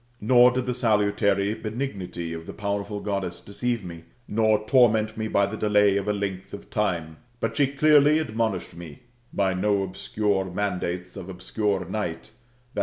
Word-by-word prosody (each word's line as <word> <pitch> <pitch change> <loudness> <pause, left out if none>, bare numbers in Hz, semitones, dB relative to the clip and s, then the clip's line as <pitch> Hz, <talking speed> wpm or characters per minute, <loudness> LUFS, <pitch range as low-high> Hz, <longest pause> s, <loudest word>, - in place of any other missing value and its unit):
Nor 125 +3 +6
did 125 0 -2
the 125 - -1
salutary 100 -3 +2
benignity 105 -7 -5
of 80 0 -8
the - - -6
powerful 100 0 -3
Goddess 100 -4 -3
deceive 115 +1 -3
roe, 85 -1 -8 0.3
nor 110 0 +2
torment 110 -3 +3
me 110 0 -3
by 100 -2 +2
the 100 +2 -5
delay 105 -2 +3
of 100 0 -1
a - - +3
length 95 -1 -4
of 100 - -13
time; 85 -7 -1 0.2
but - - -2
she 145 -2 +3
clearly 150 +1 +5
admonished 110 - -2
me 85 -1 -11 0.3
by 95 -2 +1
no 100 +2 +1
obscure 95 +1 -1
mandates 90 -1 -3
of 95 -2 -8
obscure 100 +2 -2
night 95 0 -4 0.4
[i. - - -1
100 Hz, 165 wpm, -25 LUFS, 95-110 Hz, 0.4 s, Nor